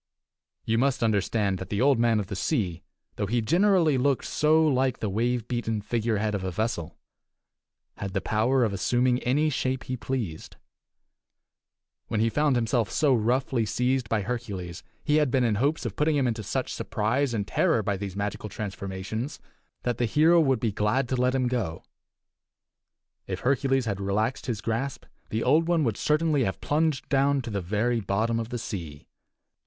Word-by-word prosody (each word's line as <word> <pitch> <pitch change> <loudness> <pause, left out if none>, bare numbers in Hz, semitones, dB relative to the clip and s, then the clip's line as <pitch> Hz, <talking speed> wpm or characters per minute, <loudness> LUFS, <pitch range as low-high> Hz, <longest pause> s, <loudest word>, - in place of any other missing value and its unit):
You 115 0 +1
must 135 -1 +1
understand 100 -2 +1
that 95 - -7
the 100 - -1
Old 135 -1 +4
Man 115 -2 +3
of 105 - -2
the 100 - -6
Sea, 95 - -1 0.4
though 100 - -1
he 120 +4 +1
generally 170 - +3
looked 140 0 +1
so 155 +1 +3
like 130 -3 +1
the 105 - -3
wave 120 +2 0
beaten 120 -3 -2
figurehead 110 0 -1
of 100 -2 -2
a 95 - -1
vessel, 85 -4 -3 1.0
had 100 -1 -5
the 95 - +1
power 115 +7 +1
of 110 -4 0
assuming 125 +5 +1
any 150 +6 +1
shape 130 -1 -1
he 130 - -3
pleased. 115 -10 -4 1.5
When 110 - -1
he 115 +1 +2
found 145 +2 +2
himself 115 -2 +1
so 145 -4 +2
roughly 125 +1 +1
seized 125 +2 0
by 110 -3 0
Hercules, 100 -7 -5 0.2
he 150 - +2
had 150 -3 +3
been 130 0 +2
in 115 -3 +2
hopes 145 +4 0
of - - -3
putting 150 +1 +2
him 140 -2 +2
into 115 -2 -1
such 105 - -3
surprise 120 +6 0
and 105 -3 -2
terror 160 -12 +2
by 100 0 0
these 95 -1 -5
magical 105 +1 -3
transformations 100 +5 -5 0.4
that 120 -2 -1
the 120 - +2
hero 160 +8 +4
would 135 -5 +3
be 115 -3 0
glad 105 +6 0
to 130 - 0
let 125 +1 +1
him 130 -1 +1
go. 110 -10 -2 1.4
If - - -4
Hercules 135 0 +1
had 100 -3 -2
relaxed 105 +7 -1
his 115 -5 -2
grasp, 120 +6 -3 0.2
the 110 +1 -1
Old 155 +6 +3
One 170 -2 +2
would 115 -6 0
certainly 150 -2 +1
have 95 - -2
plunged 155 -1 0
down 140 -1 +2
to 115 - -6
the 100 -1 -2
very 110 +6 0
bottom 110 +4 0
of 115 0 -4
the 125 - -3
sea. 85 -10 -6
120 Hz, 180 wpm, -26 LUFS, 105-135 Hz, 1.5 s, Old